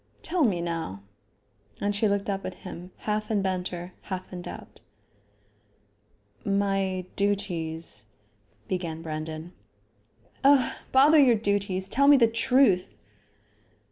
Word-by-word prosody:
Tell 345 -1 +1
me 190 -9 +2
now?" 165 - -4 0.8
And 205 0 -1
she 215 +2 +2
looked 200 0 0
up 195 -1 -2
at 185 - -5
him, 175 +2 -8 0.2
half 215 0 -1
in 205 -3 +1
banter, 180 -1 -3
half 185 -1 -6
in 180 - -5
doubt. - - -10 1.6
"My 195 -2 0
duties 165 - -1 0.3
," 105 +1 -37
began 165 -3 -3
Brandon. 155 +2 -6 0.9
"Oh! 275 -2 +5 0.2
bother 290 +4 +6
your 255 -5 +6
duties. 200 -3 -1
Tell 280 +7 +2
me 285 -1 +8
the 240 - +6
truth." 230 -4 +3
195 Hz, 120 wpm, -27 LUFS, 170-215 Hz, 1.6 s, me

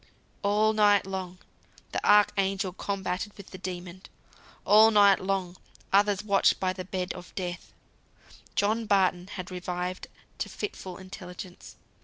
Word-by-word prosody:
All 210 +2 +3
night 205 -2 +4
long, 190 -1 -5 0.5
the - - -3
Archangel 195 -2 +3
combated 195 0 -3
with 200 - -12
the 185 - -9
Demon. 180 0 -6 0.6
All 215 +2 +7
night 205 -2 +6
long, 185 -2 -2 0.4
others 205 0 +3
watched 200 -2 +3
by 185 -1 0
the 185 0 -6
bed 185 -1 -3
of 180 -1 -12
Death. 175 -2 -5 0.8
John 220 +2 +1
Barton 185 -3 +2
had 185 -1 -7
revived 180 0 -4 0.3
to - - -2
fitful 190 - -6
intelligence. 185 -1 -10
190 Hz, 130 wpm, -28 LUFS, 180-205 Hz, 0.8 s, All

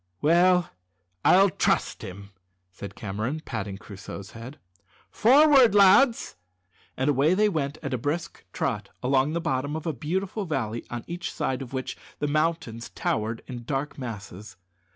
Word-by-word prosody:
"Well, 175 - +4 0.5
I'll 195 +1 +6
trust - - 0
him," 100 +2 -9 0.4
said 100 +2 -9
Cameron, 110 +10 -4
patting 100 -3 -4
Crusoe's 100 -1 -9
head. 120 +5 -10 0.5
"Forward, 270 -2 +6
lads!" 205 - +5 0.6
and 130 - 0
away 145 +6 +3
they 210 +2 +4
went 155 -6 -2
at 140 - -3
a 130 - -1
brisk 145 +7 -3
trot - - -2
along 135 +3 +2
the 170 - 0
bottom 145 -2 -1
of 160 - -5
a 160 - -1
beautiful 185 - -3
valley 120 -8 -2
on 120 -1 -5
each 175 0 -5
side 130 0 -2
of 130 - -8
which 130 -1 -4 0.2
the 145 - -1
mountains 155 -6 -1
towered 110 +1 -2
in 120 -2 -7
dark 140 +3 -3
masses. 105 -5 -8
140 Hz, 150 wpm, -26 LUFS, 115-170 Hz, 0.6 s, I'll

